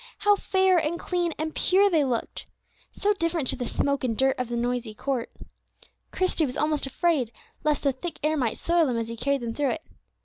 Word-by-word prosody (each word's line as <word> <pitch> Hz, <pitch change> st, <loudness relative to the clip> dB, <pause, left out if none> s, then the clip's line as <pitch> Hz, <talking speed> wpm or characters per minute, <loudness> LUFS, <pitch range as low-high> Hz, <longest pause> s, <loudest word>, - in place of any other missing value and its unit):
How 415 Hz, 0 st, +4 dB
fair, 380 Hz, -2 st, +3 dB
and 325 Hz, +2 st, -1 dB
clean, 350 Hz, -2 st, -1 dB
and 315 Hz, 0 st, -3 dB
pure 390 Hz, +2 st, +4 dB
they 325 Hz, -6 st, +3 dB
looked! 250 Hz, -4 st, -3 dB, 0.4 s
So 415 Hz, +1 st, +1 dB
different 335 Hz, -6 st, -1 dB
to -, -, 0 dB
the 245 Hz, -2 st, -4 dB
smoke 280 Hz, -1 st, 0 dB
and 230 Hz, -4 st, -1 dB
dirt 265 Hz, 0 st, +2 dB
of 250 Hz, -2 st, -2 dB
the 240 Hz, -, -2 dB
noisy 240 Hz, -2 st, -2 dB
court. 260 Hz, 0 st, -2 dB, 0.8 s
Christie 365 Hz, -4 st, +1 dB
was 250 Hz, -, -5 dB
almost 300 Hz, -2 st, 0 dB
afraid 275 Hz, -4 st, +1 dB, 0.3 s
lest 300 Hz, -1 st, +1 dB
the 280 Hz, -, +3 dB
thick 295 Hz, +6 st, -6 dB
air 310 Hz, +1 st, +2 dB
might 250 Hz, -7 st, 0 dB
soil 340 Hz, -2 st, +2 dB
them 245 Hz, -3 st, 0 dB
as 230 Hz, 0 st, -2 dB
he 230 Hz, -, -5 dB
carried 280 Hz, +3 st, 0 dB
them 230 Hz, -1 st, -3 dB
through 280 Hz, -1 st, 0 dB
it. 315 Hz, -, -7 dB
290 Hz, 210 wpm, -26 LUFS, 250-340 Hz, 0.8 s, How